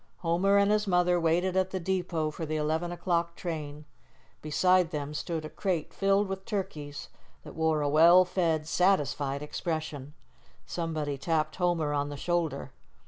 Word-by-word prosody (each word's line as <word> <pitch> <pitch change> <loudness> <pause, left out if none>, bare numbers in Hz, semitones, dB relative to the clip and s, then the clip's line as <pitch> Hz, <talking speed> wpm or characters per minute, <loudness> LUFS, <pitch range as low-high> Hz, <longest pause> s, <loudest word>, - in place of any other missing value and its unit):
Homer 180 +4 +2
and 200 +1 +4
his 210 0 +1
mother 180 -1 +3
waited 175 +3 +1
at 190 0 +2
the 190 - -3
depot 175 -4 -1
for 160 - -7
the 155 0 -2
11 160 +3 -1
o'clock 170 -1 -1
train. 150 -3 -5 0.6
Beside 180 +3 +3
them 150 -2 -4
stood 155 +2 -3
a - - -6
crate 180 -6 -2
filled 195 +1 +2
with 190 0 -5
turkeys 155 -9 -5 0.3
that - - -10
wore 160 -1 +1
a - - +1
well 170 +5 +6
fed, 165 -4 0
satisfied 145 -6 +1
expression. 150 -2 -4 0.5
Somebody 155 -5 -3
tapped 155 0 -1
Homer 170 -5 +1
on 145 0 -1
the 145 - -6
shoulder. 160 -5 -2
165 Hz, 155 wpm, -29 LUFS, 150-180 Hz, 0.6 s, well